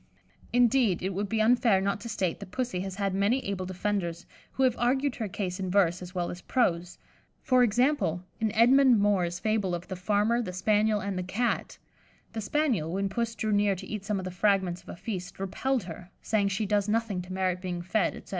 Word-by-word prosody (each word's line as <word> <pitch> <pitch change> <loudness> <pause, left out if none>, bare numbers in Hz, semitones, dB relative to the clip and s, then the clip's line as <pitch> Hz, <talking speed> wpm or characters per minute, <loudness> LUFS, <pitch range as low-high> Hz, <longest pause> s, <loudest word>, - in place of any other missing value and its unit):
Indeed, 240 -6 +3
it 190 +1 -1
would 200 +2 -2
be 225 - 0
unfair 230 -3 +4
not 200 +1 -1
to 235 - -6
state 190 -6 -1
that - - -9
Pussy 245 -5 -2
has 190 0 -4
had 195 -1 -1
many 205 +7 +1
able 185 -2 -3
defenders, 185 -2 -2 0.3
who 265 - 0
have 255 -2 +3
argued 265 +2 +1
her 220 - -2
case 185 -1 -4
in 185 -1 -2
verse 180 -2 +2
as 180 +1 -9
well 175 -1 -1
as 175 - -8
prose; 180 -8 0 0.5
for 255 -1 +4
example, 240 - +2 0.2
in 220 -1 0
Edmond 250 +1 +6
Moore's 185 -4 +1
fable 205 -3 0
of 175 +1 -7
"The 190 - -3
Farmer, 210 +5 +1
the 185 -6 -5
Spaniel 210 +2 +2
and 190 -1 -3
the - - -2
Cat" 245 0 -1 0.6
the 225 - -3
Spaniel, 225 - 0
when 195 +2 -1
Puss 230 +3 -2
drew 215 -1 -2
near 205 -1 +3
to 185 - -8
eat 210 -2 -5
some 210 0 -1
of 190 - -4
the 185 - -4
fragments 185 -2 +1
of - - -17
a - - -6
feast, 185 -1 -6
repelled 245 +6 -1
her, 175 +1 -9
saying 210 -2 +1
she 200 +2 -1
does 205 0 +1
nothing 220 -4 0
to 180 +1 -10
merit 185 -1 -1
being 175 -2 -4
fed, 190 +1 0
etc. - - -12
200 Hz, 215 wpm, -28 LUFS, 185-225 Hz, 0.6 s, Edmond